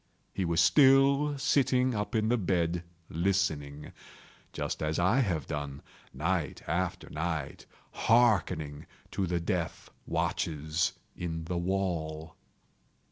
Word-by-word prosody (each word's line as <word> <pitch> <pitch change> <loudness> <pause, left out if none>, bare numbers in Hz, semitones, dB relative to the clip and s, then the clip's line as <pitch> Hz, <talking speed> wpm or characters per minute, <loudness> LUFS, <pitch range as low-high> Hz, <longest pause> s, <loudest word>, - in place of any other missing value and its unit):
He 95 - -1
was 85 0 +1
still 140 - +5
sitting 130 -2 +2
up 105 +2 -3
in 110 0 +2
the 120 - +3
bed 85 -3 0 0.3
listening;—just 80 -5 -3
as 75 0 -1
I 95 +9 +3
have 90 - 0
done, 75 -2 -5 0.3
night - - -2
after 90 +3 -2
night, 80 -2 -3 0.2
hearkening 90 -11 +2 0.2
to 95 - -1
the 85 0 0
death 85 -2 -3 0.2
watches 80 +1 -1 0.2
in 80 -2 -4
the 85 +2 -3
wall. 85 -4 -2
85 Hz, 110 wpm, -30 LUFS, 80-110 Hz, 0.3 s, still